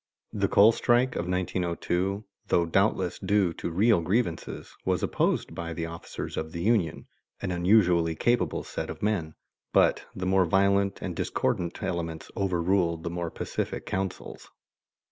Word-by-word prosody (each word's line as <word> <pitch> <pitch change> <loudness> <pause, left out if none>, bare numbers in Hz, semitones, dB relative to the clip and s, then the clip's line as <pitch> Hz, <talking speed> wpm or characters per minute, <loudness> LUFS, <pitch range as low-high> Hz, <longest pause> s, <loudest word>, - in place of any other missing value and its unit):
The 100 -2 +1
coal 105 +4 +6
strike 120 +2 +2
of 85 - -2
1902, 90 +2 -1 0.2
though 85 - +3
doubtless 80 - +1
due 95 -3 +2
to - - -4
real 100 +3 +3
grievances, 90 -1 -2
was 90 -2 0
opposed - - 0
by 85 -1 -5
the 85 0 -3
officers 85 +1 -7
of 80 0 -4
the 85 - -4
union, 100 -7 +1 0.3
an 95 - -3
unusually 90 -2 +3
capable 105 -5 +1
set - - -5
of - - -7
men, 90 -7 -1 0.4
but - - +3
the 95 - -3
more 95 0 +3
violent 100 +2 +2
and 90 -3 -3
discordant 85 +1 -1
elements 80 -2 -4
overruled 90 -3 +1
the 85 - -3
more 85 -1 -3
pacific - - -4
counsels. 95 -1 -4
90 Hz, 145 wpm, -27 LUFS, 85-100 Hz, 0.4 s, coal